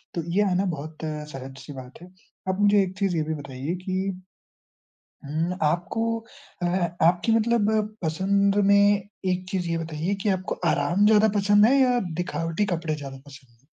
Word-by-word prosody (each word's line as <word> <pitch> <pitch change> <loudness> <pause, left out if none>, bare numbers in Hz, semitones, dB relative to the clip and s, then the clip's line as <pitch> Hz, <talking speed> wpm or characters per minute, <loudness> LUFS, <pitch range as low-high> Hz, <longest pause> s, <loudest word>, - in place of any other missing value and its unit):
तो 170 - -2
ये 205 - +4
आना 185 +2 +1
बहुत 155 +2 -8
सहज 150 -4 -6
सी 145 - -10
बात 130 +2 -11
है। 180 +1 -13 0.4
आप 190 +1 -1
मुझे 205 0 +5
एक 185 0 -6
चीज़ 195 -3 +1
ये 155 - +1
भी 160 +1 -3
बताइए 140 +2 -5
कि 190 +1 -1 1.2
उम, 160 +5 -1
आपको 175 +8 0 0.6
अ - - +2
अ, 175 -1 -1
आपकी 175 +6 +2
मतलब 225 -1 +2 0.3
पसंद 195 +5 +1
में 200 0 +4 0.2
एक 180 0 -3
चीज़ 180 -3 -2
ये 165 - 0
बताइए 165 +3 -2
कि - - 0
आपको 185 -1 -1 0.2
आराम 170 +8 +1
ज़्यादा 215 0 +5
पसंद 205 +1 +5
है 265 +4 +4
या 250 -2 +4 0.2
दिखावटी 165 +2 -2
कपड़े 165 -2 -2
ज़्यादा 140 -3 -7
पसंद 135 -3 -14
है? 135 - -34
175 Hz, 175 wpm, -25 LUFS, 155-200 Hz, 1.2 s, मुझे